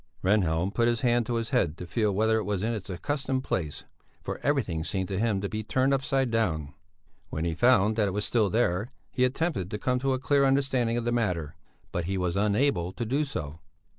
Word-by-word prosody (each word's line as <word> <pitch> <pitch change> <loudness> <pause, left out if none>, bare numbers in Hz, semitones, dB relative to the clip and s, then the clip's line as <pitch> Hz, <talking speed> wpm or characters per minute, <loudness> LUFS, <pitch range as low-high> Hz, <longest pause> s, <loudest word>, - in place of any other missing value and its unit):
Rehnhjelm 95 -2 +2
put 120 0 +2
his 120 -1 +1
hand 120 -2 +2
to 120 - -1
his 115 +3 -2
head 90 - +1
to 90 - -6
feel 105 +4 0
whether 110 +3 +2
it - - -2
was 100 -2 -2
in 115 +2 0
its 105 -4 -6
accustomed 130 +7 -2
place, 80 - -3 0.4
for - - -4
everything 110 - 0
seemed 95 +2 -2
to 95 -1 -2
him 110 -3 +1
to 100 - -1
be 110 +2 -3
turned 130 +5 +1
upside 135 -1 +1
down. 80 -11 0 0.6
When 80 +2 -3
he 85 - 0
found 110 +1 +4
that 105 -2 +3
it - - -1
was 105 +1 -1
still 110 -4 +2
there, 105 0 +1 0.2
he 125 - +1
attempted 130 - 0
to 105 - -3
come 125 +3 0
to 135 +1 +1
a 130 - -1
clear 140 +2 +2
understanding 135 -4 +2
of 120 - -2
the 120 - +1
matter, 90 -10 -1 0.4
but 85 -1 -2
he 95 +2 -1
was 90 -2 -1
unable 105 -2 +1
to 120 - -3
do 135 +7 +1
so. 80 - -5
110 Hz, 225 wpm, -28 LUFS, 95-125 Hz, 0.6 s, found